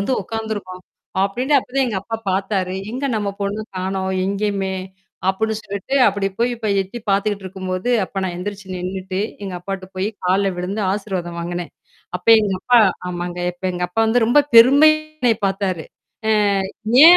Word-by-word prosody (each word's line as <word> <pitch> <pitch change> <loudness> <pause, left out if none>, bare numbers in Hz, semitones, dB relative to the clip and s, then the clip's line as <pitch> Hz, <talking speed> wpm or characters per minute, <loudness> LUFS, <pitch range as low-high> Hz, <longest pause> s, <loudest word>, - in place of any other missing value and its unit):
வந்து 200 +6 0
உக்காந்து 220 +2 -4
இருக்கோம்" 185 -2 -8 0.4
அப்படின்டு 250 +9 0
அப்பத் 250 0 -8
தான் 270 -1 +3
எங்க 205 -5 -1
அப்பா 225 +3 -4
பாத்தாரு. 190 -1 -1 0.2
"எங்க 260 +3 -3
நம்ம 205 -2 -1
பொண்ணு 200 +2 -2 0.2
காணோம், 190 0 -2
எங்கயுமே!" 195 -1 -1 0.5
அப்புடின்னு 220 +3 0
சொல்லிட்டு, 200 +6 -4
அப்படி 200 -1 +1
போய் 240 +1 +2
இப்ப 225 -2 -3
எட்டி 195 +5 -5
பாத்துக்கிட்டுருக்கும்போது, 195 0 -1
அப்ப 195 - -6
நான் 185 -2 -2
எந்திருச்சு 200 +2 -6
நின்னுட்டு, 185 +1 -3 0.2
எங்க 190 -2 -5
அப்பாட்ட 195 +1 -5
போயி 190 +2 -1 0.2
கால்ல 195 +2 +3
விழுந்து, 185 +4 -3
ஆசிர்வாதம் 190 -4 -3
வாங்குனேன். 175 0 -4 0.5
அப்ப 180 - -9
எங்க 205 -2 0
அப்பா 245 +3 +5 0.3
ஆமாங்க, 175 0 -4
அப்ப 175 +2 -16
எங்க 180 0 -2
அப்பா 180 - -1
வந்து 235 +2 +3
ரொம்ப 245 +5 +5 0.2
பெருமையா 280 +7 +8 0.2
என்னய 240 -3 +3
பார்த்தாரு. 190 -4 -1 0.4
அ - - +4 0.7
ஏன் 350 +2 +11
195 Hz, 160 wpm, -20 LUFS, 185-220 Hz, 0.7 s, ஏன்